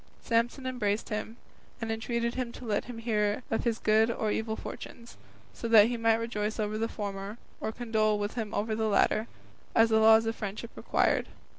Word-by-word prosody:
Samson 235 Hz, +3 st, 0 dB
embraced 225 Hz, -5 st, -1 dB
him, 220 Hz, +2 st, -4 dB, 0.4 s
and 225 Hz, -2 st, -3 dB
entreated 235 Hz, +1 st, -1 dB
him 250 Hz, -2 st, -3 dB
to 250 Hz, -, -9 dB
let 210 Hz, -3 st, 0 dB
him 245 Hz, -1 st, -8 dB
hear 215 Hz, -1 st, 0 dB
of 225 Hz, -, 0 dB
his 230 Hz, -2 st, +1 dB
good 220 Hz, +1 st, +3 dB
or 220 Hz, -2 st, -1 dB
evil 220 Hz, 0 st, -1 dB
fortunes, 235 Hz, +1 st, -9 dB, 0.4 s
so 230 Hz, -, -5 dB
that 225 Hz, -1 st, +7 dB
he 245 Hz, -, -1 dB
might 225 Hz, -1 st, +3 dB
rejoice 220 Hz, -1 st, -2 dB
over 215 Hz, 0 st, -1 dB
the 225 Hz, -, 0 dB
former 200 Hz, 0 st, -5 dB, 0.2 s
or 220 Hz, -, -2 dB
condole 220 Hz, -2 st, +1 dB
with 205 Hz, +1 st, -3 dB
him 220 Hz, -4 st, -4 dB
over 220 Hz, +2 st, -1 dB
the 220 Hz, 0 st, 0 dB
latter, 215 Hz, +2 st, +2 dB, 0.5 s
as 225 Hz, 0 st, +6 dB
the 220 Hz, 0 st, +4 dB
laws 220 Hz, +1 st, +6 dB
of 225 Hz, 0 st, -1 dB
friendship 215 Hz, +3 st, -5 dB
required. -, -, +1 dB
225 Hz, 190 wpm, -29 LUFS, 215-230 Hz, 0.5 s, that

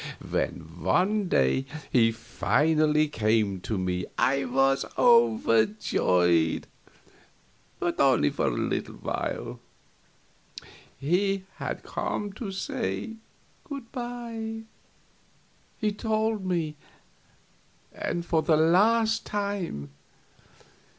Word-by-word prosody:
When 80 Hz, +1 st, -3 dB
one 190 Hz, -, +2 dB
day 65 Hz, -, +2 dB, 0.2 s
he 115 Hz, -2 st, +4 dB
finally 150 Hz, +7 st, +2 dB
came 110 Hz, -6 st, +1 dB
to 110 Hz, -, -3 dB
me 90 Hz, -1 st, -2 dB
I 135 Hz, +1 st, +2 dB
was 135 Hz, +2 st, +2 dB
overjoyed, 110 Hz, -, +3 dB, 1.1 s
but 175 Hz, 0 st, -1 dB
only 130 Hz, -, +4 dB
for -, -, 0 dB
a -, -, +4 dB
little -, -, -2 dB
while. -, -, -4 dB, 1.4 s
He 190 Hz, +6 st, +1 dB
had -, -, -4 dB
come 205 Hz, -1 st, -3 dB
to 210 Hz, -1 st, -5 dB
say 225 Hz, +1 st, -3 dB, 0.5 s
good 275 Hz, -8 st, -8 dB
by, 235 Hz, -3 st, -5 dB, 1.2 s
he 215 Hz, -1 st, 0 dB
told 215 Hz, -1 st, -1 dB
me, 160 Hz, -4 st, -1 dB, 1.2 s
and 170 Hz, -1 st, -3 dB
for 165 Hz, -2 st, +2 dB
the 155 Hz, -1 st, +3 dB
last 220 Hz, +8 st, +3 dB
time. 200 Hz, -, -3 dB
165 Hz, 90 wpm, -27 LUFS, -, 1.4 s, he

